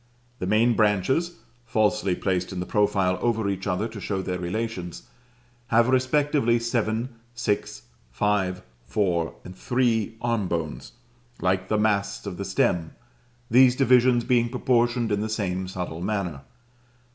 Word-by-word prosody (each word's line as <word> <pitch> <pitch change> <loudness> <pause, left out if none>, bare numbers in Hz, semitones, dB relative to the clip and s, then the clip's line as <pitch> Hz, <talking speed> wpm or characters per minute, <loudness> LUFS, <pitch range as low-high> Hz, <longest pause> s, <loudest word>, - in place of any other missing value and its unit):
The 90 - -3
main 110 +4 +3
branches 115 - +2 0.3
(falsely 105 -4 +1
placed 90 -1 -1
in 95 - -4
the 90 - -3
profile 95 -3 +1
over 110 -3 0
each 95 0 -3
other 100 +3 0
to 110 -3 -9
show 95 -1 -2
their 90 -1 -3
relations) 90 -1 -4 0.6
have 115 +2 +3
respectively 130 -1 +2
seven, 115 0 -1 0.3
six, 110 -4 -2 0.3
five, 95 -3 0 0.2
four, 85 - -1
and 90 - -9
three 115 -1 0
arm 115 -5 0
bones, 85 -8 -4 0.5
like 95 0 0
the 110 - +2
masts 105 -2 0
of 95 -3 -5
the 100 - -4
stem; 85 -3 0 0.6
these 125 +1 +6
divisions 125 -2 +4
being 120 -1 +2
proportioned 120 -2 +1
in 105 0 +1
the 110 - -2
same 95 -4 -2
subtle 90 -3 -5
manner. 90 -7 -2
105 Hz, 140 wpm, -25 LUFS, 95-120 Hz, 0.6 s, these